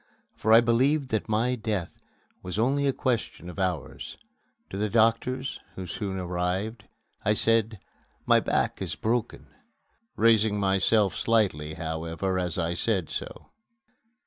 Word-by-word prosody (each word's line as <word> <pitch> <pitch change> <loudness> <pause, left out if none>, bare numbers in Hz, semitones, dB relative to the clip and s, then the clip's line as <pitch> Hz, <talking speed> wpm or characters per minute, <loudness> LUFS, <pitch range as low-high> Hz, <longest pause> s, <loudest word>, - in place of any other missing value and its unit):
For 110 - -1
I 115 +1 +9
believed 130 +5 +2
that 110 -1 -2
my 115 +4 +1
death 110 -7 -3 0.4
was 90 +1 -5
only 140 +5 +2
a - - +4
question 115 -9 -2
of 95 - -10
hours. 90 -6 -3 0.5
To 95 - -4
the 105 0 0
doctors, 115 +4 +1 0.2
who 95 - -6
soon 95 0 -4
arrived, 90 +4 -2 0.4
I 105 - +2
said, 115 -1 +2 0.5
"My - - +5
back - - -1
is - - -3
broken!" 115 +1 -2 0.7
raising 110 -2 +3
myself 95 +1 +3
slightly, 90 -10 +1
however, 80 +3 -2
as 90 -2 -2
I 85 -1 0
said 95 -2 -1
so. - - -7
105 Hz, 135 wpm, -27 LUFS, 90-115 Hz, 0.7 s, I